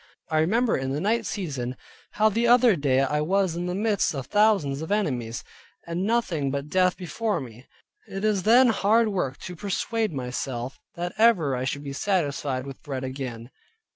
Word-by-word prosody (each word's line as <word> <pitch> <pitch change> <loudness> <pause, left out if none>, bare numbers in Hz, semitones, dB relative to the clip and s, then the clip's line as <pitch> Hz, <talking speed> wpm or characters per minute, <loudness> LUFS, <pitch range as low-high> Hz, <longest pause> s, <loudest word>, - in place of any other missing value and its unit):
I 155 - +3
remember 225 +9 +2
in 135 0 -2
the 145 - -1
night 225 +5 0
season, 135 - -4 0.4
how 215 +1 +4
the 230 +3 +1
other 240 -3 +6
day 135 -4 +2
I 150 +2 +1
was 185 +1 +1
in 175 +1 -3
the 180 - -2
midst 205 -5 +1
of 135 -2 -4
thousands 195 - +2
of 160 - -5
enemies, 125 - -1 0.4
and 170 +1 -3
nothing 185 -11 0
but 140 +2 -3
death 185 +1 +2
before 210 +4 -2
me. 125 -2 -10 0.4
It 195 +1 -6
is 210 -3 +2
then 240 +5 +6
hard 220 +1 +3
work 160 -10 -2
to 180 - -7
persuade 210 +4 -1
myself, 125 -1 -4 0.2
that 175 +1 -4
ever 185 - +4
I 125 +1 -2
should 140 +2 -3
be 140 -1 -5
satisfied 140 -7 -1
with 135 -1 -9
bread 135 -3 -5
again. 130 -2 -6
170 Hz, 180 wpm, -25 LUFS, 135-210 Hz, 0.4 s, other